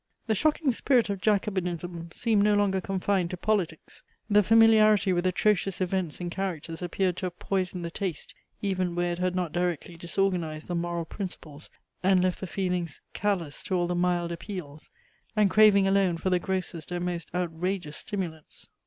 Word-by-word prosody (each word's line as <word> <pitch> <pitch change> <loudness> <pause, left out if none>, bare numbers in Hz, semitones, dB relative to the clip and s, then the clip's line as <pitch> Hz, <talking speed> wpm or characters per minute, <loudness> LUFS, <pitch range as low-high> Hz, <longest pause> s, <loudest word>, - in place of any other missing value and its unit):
The 220 - +1
shocking 300 - +2
spirit 240 -2 +2
of 195 -2 -4
jacobinism 180 -5 -1
seemed 220 +2 +1
no 210 0 +4
longer 195 -2 +2
confined 190 -1 0
to 180 - -5
politics. 185 -5 -2 0.3
The 205 0 +7
familiarity 215 -2 +5
with 175 +1 +1
atrocious 195 0 +1
events 185 -3 -1
and 175 -1 -4
characters 170 -3 -4
appeared 180 0 0
to 185 - -2
have 175 0 -9
poisoned 185 -2 -2
the 170 - -5
taste, 180 -4 -4 0.3
even 185 -3 0
where 175 0 0
it 175 - -4
had 180 0 0
not 180 -4 -1
directly 175 0 -2
disorganized 170 -3 -1
the 175 - -4
moral 170 -1 -2
principles, 160 -5 -7 0.3
and 185 -1 +4
left 185 -1 0
the 190 - -5
feelings 180 -4 -2
callous 180 -8 -1
to 190 - -2
all 175 -1 +2
the 175 - -1
mild 175 -1 +1
appeals, 170 -5 -7 0.5
and 210 -3 +3
craving 210 -2 +6
alone 195 -3 +2
for 185 +3 -1
the 180 - +3
grossest 185 -3 -3
and 175 0 -2
most 175 -2 -3
outrageous 175 -2 -2
stimulants. 175 -7 -6
180 Hz, 170 wpm, -27 LUFS, 175-195 Hz, 0.5 s, The